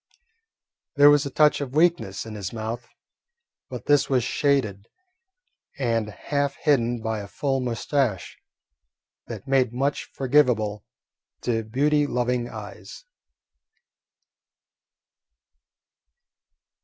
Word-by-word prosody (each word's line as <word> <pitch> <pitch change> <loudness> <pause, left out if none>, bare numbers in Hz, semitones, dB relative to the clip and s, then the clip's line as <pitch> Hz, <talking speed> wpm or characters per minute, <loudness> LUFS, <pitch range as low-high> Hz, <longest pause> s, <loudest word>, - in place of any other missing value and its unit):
There 145 0 +8
was 145 -1 +3
a - - -4
touch 150 +2 +3
of 135 -1 -5
weakness 155 - +1
in 110 - -8
his 100 -3 -5
mouth, 115 +2 -5 0.8
but - - -7
this 145 -1 +3
was 130 -3 +2
shaded 120 -6 0 0.9
and 115 -5 0
half 140 +6 -2
hidden 120 -6 +1
by 110 -1 -2
a 100 - -7
full 135 +5 -1
mustache 125 - -2 0.9
that - - -8
made 130 -3 +2
much 140 +3 -1
forgivable 125 -7 +1 0.6
to 115 -2 0
beauty 145 +6 +1
loving 125 -1 -1
eyes. - - -10
125 Hz, 100 wpm, -24 LUFS, 110-140 Hz, 0.9 s, There